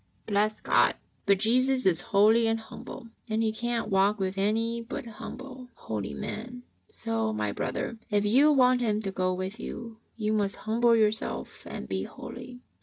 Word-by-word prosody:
Bless 215 0 +1
God! - - +4 0.3
But 200 -1 +5
Jesus 255 +5 +2
is 175 -3 +4
holy 220 +2 +4
and 225 0 +1
humble 225 +1 -10 0.2
and 220 +1 +1
He 220 - +2
can't 235 0 -1
walk 195 +2 +3
with 190 -1 -2
any 225 +4 0
but 230 +1 -6
humble, 255 +3 -9
holy 105 -2 -4
men, 245 +3 -6 0.2
so, 110 -1 -1
my 105 -1 -1
brother, 230 - -3
if 205 -1 +2
you 270 +8 +5
want 255 -3 +4
Him 215 -3 +1
to 195 - -2
go 185 -1 0
with 185 +4 -4
you, 230 -1 -7 0.2
you 215 -1 0
must 205 -2 +1
humble 230 +2 +4
your 215 -2 +5
self 220 - -5
and 65 - -6
be 95 +4 -2
holy. 245 - -8
220 Hz, 175 wpm, -28 LUFS, 195-235 Hz, 0.3 s, But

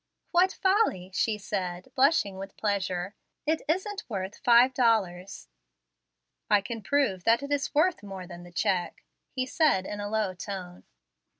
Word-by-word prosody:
"What 365 +1 +4
folly!" 380 - +1
she 215 +2 +1
said, 185 -3 -4
blushing 265 -8 +2
with 195 0 -8
pleasure; 190 -2 -1 0.3
"it 315 +1 +1
isn't 380 +6 -1
worth 195 -2 -4
five 245 0 +6
dollars." 200 -7 0 1.0
"I 210 - +6
can 225 +3 -6
prove 200 -5 +1
that 230 +4 +4
it 280 - -6
is 285 0 -1
worth 335 +3 +3
more 195 -3 -8
than 175 -1 -10
the 175 0 -13
check," 180 -1 -1 0.3
he 255 -1 -2
said, 270 - +2
in 205 - -5
a 205 0 -4
low 215 -3 0
tone. 180 -1 -7
210 Hz, 155 wpm, -28 LUFS, 185-275 Hz, 1.0 s, five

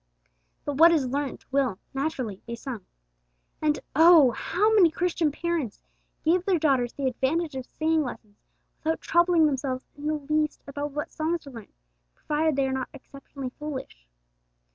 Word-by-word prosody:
But 285 -2 -3
what 335 +2 +8
is 310 -5 +2
learnt 275 +1 -3
will, 265 -7 +1 0.2
naturally, 270 -8 -3
be 235 - -4
sung. 235 -4 -7 0.8
And 305 -1 +1 0.2
oh! 320 -4 +7
how 415 - +1
many 380 -6 +6
Christian 335 -1 0
parents 320 -7 -2 0.5
give 345 +3 +3
their 370 -2 +2
daughters 265 -6 +1
the 280 - -4
advantage 285 +5 0
of 260 -1 -6
singing 315 0 +1
lessons 215 -6 -8 0.4
without 320 +1 0
troubling 345 -1 +3
themselves 265 -3 -1
in 290 +1 -6
the 310 - +1
least 305 +1 -1
about 285 +1 -5
what 295 +1 -4
songs 320 +1 -2
are 280 - -10
learnt, 230 -4 -12 0.4
provided 305 0 0
they 275 0 +2
are 265 - -2
not 260 -1 -3
exceptionally 275 -1 -9
foolish! 265 - -7
290 Hz, 160 wpm, -26 LUFS, 265-320 Hz, 0.8 s, what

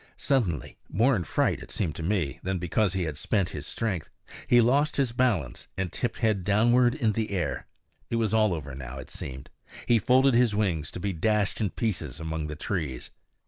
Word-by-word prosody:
Suddenly 100 - 0
more 120 +9 +3
in 90 - -1
fright, - - +1
it - - -10
seemed 85 -7 -2
to - - -5
me, 85 -5 -1
than 95 0 -1
because 90 +3 +1
he 95 -2 0
had 80 -3 -4
spent 100 -4 +1
his 75 -1 -6
strength 105 -8 -2 0.4
he 120 - +6
lost 140 +6 +3
his 135 -4 +1
balance 115 - 0
and 95 -2 -2
tipped 120 -3 -2
head 110 -5 +1
downward 120 +5 +4
in 120 -8 +1
the 110 +1 -2
air. 95 -4 -2 0.4
It - - -1
was 110 -2 +1
all 110 -2 +4
over 70 -3 -6
now, 65 0 -7
it 65 - -9
seemed; 65 0 -8 0.3
he 120 -1 +4
folded 130 +5 +4
his 120 -3 +4
wings 85 -8 0
to - - -7
be 100 +1 -2
dashed 105 +5 +1
in 105 - +1
pieces 85 - -3
among 80 -1 -3
the 75 - -5
trees. 75 - -3
100 Hz, 200 wpm, -27 LUFS, 80-115 Hz, 0.4 s, he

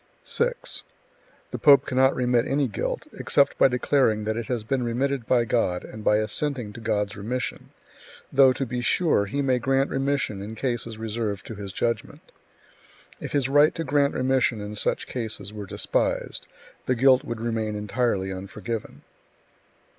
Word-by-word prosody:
6. - - -1 0.7
The - - -4
pope 145 -3 +6
cannot 130 0 +3
remit 125 -1 +2
any 140 0 +1
guilt, 105 - -3
except 140 - +2
by - - +7
declaring 125 -3 +2
that 110 +1 -1
it 115 -1 -4
has 120 -4 -2
been 130 +4 -1
remitted 125 +1 -1
by 120 -2 +3
God 100 -6 0
and 110 - -9
by 105 - +4
assenting 115 +1 -1
to 115 - -10
God's 105 -2 -1
remission; 120 +5 -4 0.6
though, 135 -1 +7
to 135 +2 -2
be 125 0 -3
sure, 120 - +2
he 140 +7 -1
may 130 -2 +2
grant 135 +3 +1
remission 135 -7 -1
in 105 +3 -7
cases 115 -2 -3
reserved 110 -3 -3
to - - -7
his 100 -2 -7
judgment. 115 +4 -3 0.9
If - - -7
his 140 -3 +2
right 145 +3 +4
to 165 - -2
grant 140 -1 +1
remission 130 -3 +1
in 105 +1 -6
such - - 0
cases 110 -4 -5
were 105 -2 -7
despised, - - -1 0.4
the 130 - +2
guilt 130 +1 +5
would 115 -1 -5
remain 110 -2 -2
entirely 105 -2 -1
unforgiven. 100 +4 -6
120 Hz, 160 wpm, -25 LUFS, 110-135 Hz, 0.9 s, by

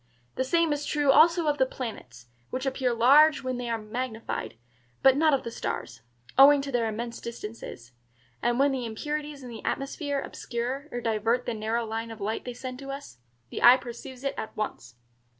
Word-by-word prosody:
The - - -1
same 330 +3 +2
is 290 0 -3
true 290 -1 +2
also 335 +4 +5
of 295 -1 +1
the 260 - +5
planets, 125 - -7 0.2
which 260 +1 -3
appear 265 -1 0
large 285 +7 +6
when 255 -1 -2
they 245 -1 -4
are 230 - 0
magnified, 225 - -4 0.5
but 265 -1 +7
not 310 +2 +4
of 270 - -3
the 235 - -5
stars, 120 - -5 0.4
owing 285 +1 +9
to 275 - -5
their 240 -3 +1
immense 230 +2 -5
distances; 215 - -8 0.5
and 240 0 +1
when 280 +1 +4
the 255 -3 -2
impurities 295 +5 -4
in 250 - -8
the 225 - -9
atmosphere 285 +1 -2
obscure 255 +3 -4
or 245 - -3
divert 225 +2 0
the 240 - -2
narrow 225 +2 -1
line 225 +1 -4
of 225 -1 -9
light 210 +2 -3
they 245 - -4
send 255 0 -6
to 275 0 -8
us, 275 - -8 0.3
the - - -5
eye 245 +2 +9
perceives 250 +1 -9
it 275 - -1
at 220 - -7
once. 125 - -4
250 Hz, 195 wpm, -27 LUFS, 225-275 Hz, 0.5 s, owing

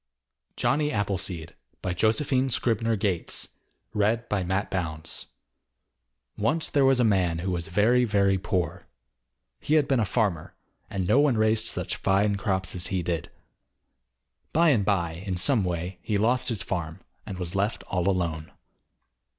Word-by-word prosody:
JOHNNY 150 +1 +1
APPLESEED 95 -5 -2 0.4
JOSEPHINE 130 - +1
SCRIBNER 115 -2 +1
GATES 95 -5 -1 0.4
Once 95 - -3
there 140 -2 +4
was 135 -1 +4
a - - +4
man 95 -6 +2
who 90 +3 -2
was 85 -2 -2
very, 110 +8 +3
very 100 -4 +2
poor. 90 -1 -2 0.7
He 155 - +1
had 150 -3 +3
been 135 -3 +2
a 110 - +2
farmer, 95 -6 -1 0.3
and 95 -4 -2
no 135 - +4
one 145 -5 +3
raised 110 +1 +3
such - - -3
fine 100 +1 +2
crops 95 -2 -1
as 90 -1 0
he 95 -3 -1
did. 85 -1 -2 1.2
By 165 +2 +4
and 120 -9 +3
by, 85 -4 0
in 95 -3 -3
some 115 +3 +2
way, 90 0 -3
he 105 - -1
lost 120 +5 +2
his 110 -7 -2
farm, 85 -3 -4 0.3
and 95 - -5
was 90 -1 -5
left 100 +3 -1
all 90 0 0
alone. 85 -4 -2
100 Hz, 140 wpm, -26 LUFS, 90-115 Hz, 1.2 s, there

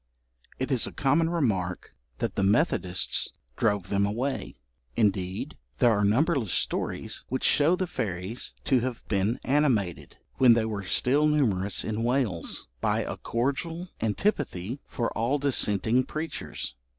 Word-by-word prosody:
It 130 +2 -2
is 125 -4 +2
a - - -6
common 155 +3 +2
remark 105 - -1 0.2
that - - -2
the - - -1
Methodists 100 - +1 0.2
drove 100 -5 0
them 100 0 +2
away; 120 +7 -2 0.4
indeed, 100 +5 0 0.2
there 120 -3 +5
are 105 -2 +2
numberless 120 - +2
stories - - -1
which 130 - -2
show 150 +5 +4
the 185 - -1
fairies 100 - -3
to 130 - +3
have 125 0 -4
been 100 +3 +1
animated, 130 - 0 0.2
when 125 -3 +7
they 115 -1 +2
were 105 -2 -3
still 130 - +3
numerous 105 -11 +1
in 110 0 -2
Wales, 120 -8 -1
by - - +1
a - - -4
cordial 160 +9 -2
antipathy 115 - -1
for 115 - -3
all 120 +6 +1
dissenting 125 -3 +2
preachers. 155 - -5
120 Hz, 140 wpm, -27 LUFS, 100-140 Hz, 0.4 s, when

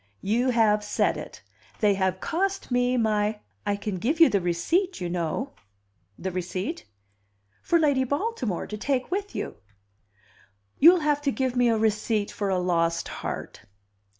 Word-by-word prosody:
"You 235 +6 +1
have 215 -3 +3
said 210 - +1
it. - - -9 0.4
They 210 -2 +4
have 190 -1 0
cost 385 - -2
me 245 +1 +2
my 215 -2 +1
" 100 0 -42
"I 205 - +2
can 200 -1 -4
give 285 - 0
you 330 - +8
the 200 - +1
receipt, 335 - 0
you 175 -1 -3
know." 180 - -2 0.6
"The 190 - -4
receipt?" 180 - -4 0.8
"For 340 - +2
Lady 285 -5 +3
Baltimore, 285 - -2
to 210 - -6
take 265 +4 -1
with 400 +2 -3
you." - - -4 1.2
"You'll 340 +3 +7
have 295 -1 +1
to 285 -1 +1
give 260 -1 -1
me 245 -1 +3
a 225 - +2
receipt 215 -1 0
for 200 -1 -2
a 190 - +1
lost 170 -2 0
heart." - - -6
220 Hz, 160 wpm, -26 LUFS, 190-280 Hz, 1.2 s, you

